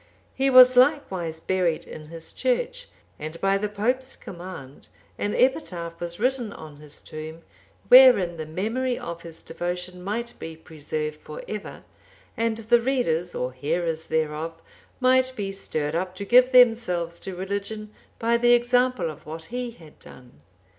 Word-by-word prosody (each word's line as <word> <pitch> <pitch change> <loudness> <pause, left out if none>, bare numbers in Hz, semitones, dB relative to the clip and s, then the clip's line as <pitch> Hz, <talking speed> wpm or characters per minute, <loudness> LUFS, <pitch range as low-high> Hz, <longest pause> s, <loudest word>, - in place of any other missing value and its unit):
He 270 0 +1
was 255 -1 +8
likewise 195 - +2
buried 180 -2 0
in 155 -1 -10
his 165 0 -7
church, - - -1 0.3
and 155 +2 -6
by 195 0 +2
the 210 +1 -2
pope's 250 +6 -1
command 175 -7 -10 0.3
an 205 - -1
epitaph(798) 180 - 0
was 175 +1 -5
written 250 -2 0
on 155 -2 -11
his 150 0 -8
tomb, 155 +1 -8 0.4
wherein 245 -10 +7
the 155 -1 -5
memory 230 +10 -2
of 170 0 -6
his 165 -1 -10
devotion 180 +2 -5
might 235 +5 -3
be 160 0 -7
preserved 155 -1 -5
for 155 - -9
ever, 210 -1 -7 0.5
and 230 -1 0
the 230 +1 +3
readers 180 -10 0
or 125 0 -3
hearers 160 +4 -2
thereof 160 +1 -2 0.4
might 260 0 +3
be 200 -4 -3
stirred 155 -6 -2
up 180 +2 -2
to 200 - -5
give 250 +4 +6
themselves 220 -9 +4
to 190 - -6
religion 200 +3 -4 0.2
by 230 +1 +2
the 240 +1 +5
example 245 -5 +2
of 155 0 -15
what 160 +1 -7
he 250 0 -2
had 165 -10 -16
done. 125 - -15
185 Hz, 155 wpm, -25 LUFS, 160-240 Hz, 0.5 s, was